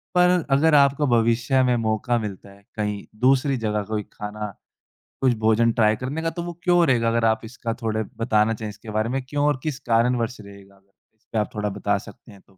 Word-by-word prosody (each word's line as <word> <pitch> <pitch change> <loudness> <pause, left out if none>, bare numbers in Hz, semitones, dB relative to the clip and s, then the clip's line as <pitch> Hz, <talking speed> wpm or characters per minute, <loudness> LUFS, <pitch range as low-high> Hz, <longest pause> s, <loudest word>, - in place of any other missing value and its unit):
पर 180 0 +5 0.2
अगर 150 +3 +4
आपको 140 0 +4
भविष्य 120 +2 +2
में 125 -1 +2
मौका 115 +2 0
मिलता 100 -2 -7
है 100 0 -19
कहीं 105 -2 -3 0.2
दूसरी 135 +2 +3
जगह 105 -2 -1
कोई 105 -1 -2
खाना 105 0 -5 0.7
कुछ 130 -2 +4
भोजन 110 +1 +3
ट्राई 110 -2 +3
करने 135 +7 -4
का 165 - 0
तो 170 0 -5
वो 175 0 -5
क्यों 175 -1 +4
रहेगा? 115 -3 +2
अगर 115 0 +1
आप 110 0 +2
इसका 115 0 -5
थोड़ा 110 -1 -1
बताना 115 -1 +2
चाहे 110 0 -5
इसके 110 +2 -11
बारे 110 +2 -1
में 135 +1 -1
क्यों 145 0 0
और 145 -3 +1
किस 150 -3 -3
कारणवश 115 +1 +1
रहेगा? 100 -1 -14
अगर 100 0 -29 0.2
इस 110 - -43
पे 115 - -2
आप 105 - -1
थोड़ा 105 0 -1
बता 100 0 -1
सकते 115 +3 -13
हैं 100 - -15
तो? - - -39
115 Hz, 215 wpm, -23 LUFS, 105-130 Hz, 0.7 s, पर